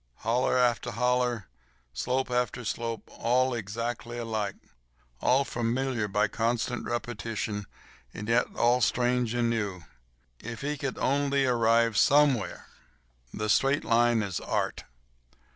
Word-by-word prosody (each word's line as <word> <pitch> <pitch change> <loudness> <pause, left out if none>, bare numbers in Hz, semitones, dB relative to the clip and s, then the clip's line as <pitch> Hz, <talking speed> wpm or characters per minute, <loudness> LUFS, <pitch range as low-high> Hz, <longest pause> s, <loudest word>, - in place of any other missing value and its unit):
Hollow 125 +3 +2
after 120 -1 +2
hollow, 125 -1 +1 0.5
slope 125 - -1
after 125 0 -1
slope—all 120 +3 -1
exactly 115 +2 -4
alike—all 100 - -3
familiar 120 -1 -1
by 105 +1 +1
constant 115 +3 -1
repetition, 110 -3 -3 0.4
and 105 - -7
yet 115 +1 +3
all 120 +2 +3
strange 120 0 +1
and 120 -1 +2
new. 100 -6 -2 0.6
If 115 0 -7
he 145 +1 -2
could 135 -2 -4
only 140 0 +1
arrive 115 -2 +3
somewhere. 140 -6 +3 0.7
The 105 - -3
straight 135 +6 +2
line 115 -1 +3
is 95 -4 -3
Art. - - -2
120 Hz, 110 wpm, -28 LUFS, 110-125 Hz, 0.7 s, yet